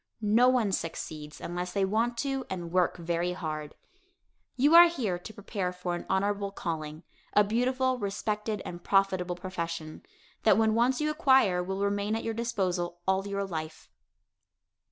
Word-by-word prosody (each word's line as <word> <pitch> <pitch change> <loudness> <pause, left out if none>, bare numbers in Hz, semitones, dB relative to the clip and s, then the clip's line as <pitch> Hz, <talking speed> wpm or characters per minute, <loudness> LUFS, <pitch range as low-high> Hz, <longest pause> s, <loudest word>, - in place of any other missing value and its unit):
No 225 +4 +5
one 240 -6 +2
succeeds 155 -3 -5
unless 180 +1 -4
they 195 -1 +2
want 230 +4 0
to 270 +1 -1
and 175 -3 -5
work 180 -1 +2
very 170 +1 -1
hard. 155 -4 -5 0.8
You 285 +5 +3
are 345 +1 +10
here 225 - -2
to 180 - -9
prepare 195 -3 -3
for 180 -1 -4
an 175 - -5
honorable 200 +1 0
calling, 160 -4 -5 0.3
a 210 - +6
beautiful, 255 +4 0
respected 210 +1 -2
and 175 0 -7
profitable 185 -3 +1
profession, 170 -3 -5 0.4
that 215 -2 +5
when 220 -1 +3
once 245 +5 +2
you 305 0 +1
acquire 265 - +4
will 190 +2 -2
remain 205 +1 0
at 225 - -3
your 225 - -2
disposal 185 -7 -2
all 190 +1 +1
your 200 0 -2
life. 160 -3 -6
195 Hz, 155 wpm, -29 LUFS, 175-225 Hz, 0.8 s, are